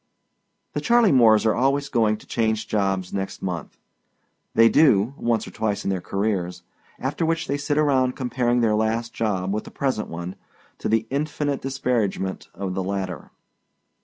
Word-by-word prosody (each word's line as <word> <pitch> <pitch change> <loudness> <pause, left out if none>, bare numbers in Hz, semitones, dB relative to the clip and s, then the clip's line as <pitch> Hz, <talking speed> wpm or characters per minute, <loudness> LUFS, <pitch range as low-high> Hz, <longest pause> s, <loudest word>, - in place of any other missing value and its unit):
The - - -2
Charley 235 -4 +4
Moores 115 -5 +5
are 110 - +4
always 140 +3 +1
going 110 -4 +2
to - - -17
change 110 -1 -1
jobs 95 -4 -1
next 95 -1 -4
month. 85 -5 -4 0.8
They 115 0 +7
do, 115 -4 +4
once 120 -3 0
or - - -9
twice 105 -2 -2
in 100 - 0
their 95 -2 -2
careers, 95 -3 -2 0.3
after - - -2
which 165 0 0
they 140 - -1
sit 145 +1 -1
around 130 -4 +2
comparing 125 -2 0
their 110 -2 +3
last 110 +2 0
job 95 -4 -1
with 105 - -2
the - - -9
present 130 -6 -2
one, 85 +2 -6 0.4
to - - -2
the 110 0 +2
infinite 145 0 -1
disparagement 120 -8 -1
of 95 0 -3
the 95 - -2
latter. 95 -4 -4
110 Hz, 165 wpm, -23 LUFS, 100-130 Hz, 0.8 s, They